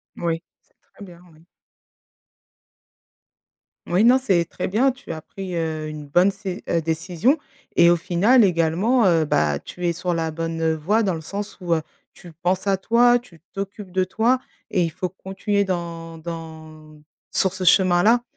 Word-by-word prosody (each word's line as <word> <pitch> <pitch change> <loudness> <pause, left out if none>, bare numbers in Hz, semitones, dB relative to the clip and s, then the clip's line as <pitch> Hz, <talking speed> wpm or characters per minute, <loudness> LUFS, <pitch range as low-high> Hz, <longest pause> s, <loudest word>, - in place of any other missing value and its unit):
Moui. 165 -1 -2 0.2
C'est - - -39 0.2
très - - -12
bien, 175 -2 -14
oui. 155 +2 -22 2.4
Oui, 180 +4 +2
non 245 +3 +6
c'est 190 -10 +1
très 180 - -5
bien, 245 +8 +2
tu 260 -5 -10
as 160 -1 -6
pris, 190 +2 -8
heu, 160 -2 -2
une 150 -1 -8
bonne 175 +7 +4
cé 195 -2 -6
heu, 165 - +1
décision 170 - 0 0.4
et 170 0 +6
au - - +5
final 195 +9 +3
également, 185 +7 +2
heu, 165 -4 +3
bah, 75 - +1
tu 180 - -7
es 170 - +1
sur 175 +1 -2
la 165 -1 -1
bonne, 165 +1 -4
heu, 160 0 +1
voie 195 +9 +1
dans 190 -3 +1
le 160 - -5
sens 200 +6 -6
où, 170 -2 +1
heu, 160 - -2 0.3
tu 175 - -14
penses 185 +2 0
à 195 -1 +2
toi, 240 +4 +4
tu 210 -9 -19
t'occupes 195 0 -6
de 185 +1 +1
toi 225 +7 +1 0.3
et 180 - +2
il 165 - 0
faut 180 +3 -4
continuer 195 +2 -2
dans 170 -3 -4
dans 160 -2 -9 0.3
sur 190 -1 +1
ce 190 -1 -5
chemin-là. 185 +6 +4
175 Hz, 175 wpm, -22 LUFS, 165-200 Hz, 2.4 s, non